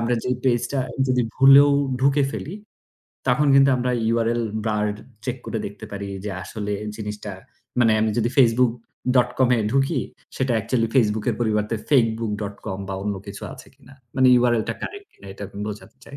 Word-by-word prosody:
আমরা 115 +1 +1
যেই 125 -1 0
page 120 -3 +2
টা 135 - 0 0.3
যদি 125 -1 +2
ভুলেও 140 +1 +8 0.3
ঢুকে 140 +2 +3
ফেলি, 165 +7 -5 0.7
তখন 140 +4 +3
কিন্তু 140 0 +6
আমরা 125 0 -1 0.2
URL 115 0 +1 0.2
bar 105 -1 0 0.4
check 125 0 -3
করে 110 - -2
দেখতে 100 +2 -9
পারি 100 0 -5 0.2
যে, 105 - -3
আসলে 105 0 -5 0.2
জিনিসটা 105 -1 -6 0.5
মানে 115 -2 +5
আমি 110 0 +2
যদি 115 +1 +1
facebook.com 125 +1 +2
এ - - +1
ঢুকি 135 +1 +1 0.4
সেটা 130 -2 0
actually 115 +1 0
Facebook 110 -4 +2
এর - - -2
পরিবর্তে 105 -1 0 0.2
fakebook.com 110 -6 0
বা 95 - -3
অন্য 105 0 -2
কিছু 100 0 -8
আছে - - -13
কিনা? 135 - -19 0.2
মানে 130 0 +5
URL 120 -2 +2
টা - - -1
correct 405 0 -7
কিনা 100 - -16
এটা 100 - -10
আমি 100 0 -9
বোঝাতে 105 +3 -9
চাই। 140 - -10
115 Hz, 170 wpm, -23 LUFS, 105-130 Hz, 0.7 s, ভুলেও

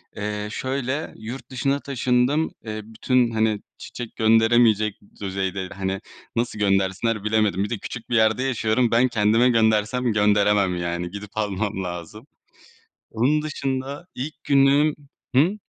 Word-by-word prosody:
eee, 105 0 -3
şöyle 135 +4 -3
yurt 115 +5 -8
dışına 135 +2 0
taşındım. 130 +3 +1
Eee, 110 -1 -4
bütün, 120 +2 +1
hani, 110 -2 +1 0.2
çiçek 120 -2 -8
gönderemeyecek 110 -1 +4 0.2
düzeyde, 95 -1 -3
hani, 95 0 -3 0.4
nasıl 115 -2 -1
göndersinler 100 +2 +1
bilemedim. 105 -3 +1
Bir 105 - -3
de 120 - -2
küçük 120 +4 -8
bir 120 - 0
yerde 110 +3 +3
yaşıyorum. 120 -2 +1
Ben 120 +2 +4
kendime 115 +1 +3
göndersem, 110 +1 +2
gönderemem 105 -3 +3
yani. 85 0 -3
Gidip 100 0 -8
almam 105 -1 -2
lazım. 90 - -7 0.8
Onun 140 +7 +2
dışında 140 +1 -4
ilk 145 +5 -6
günüm 140 +2 +4 0.4
Hı? 175 +10 +3
110 Hz, 130 wpm, -23 LUFS, 105-130 Hz, 0.8 s, gönderemeyecek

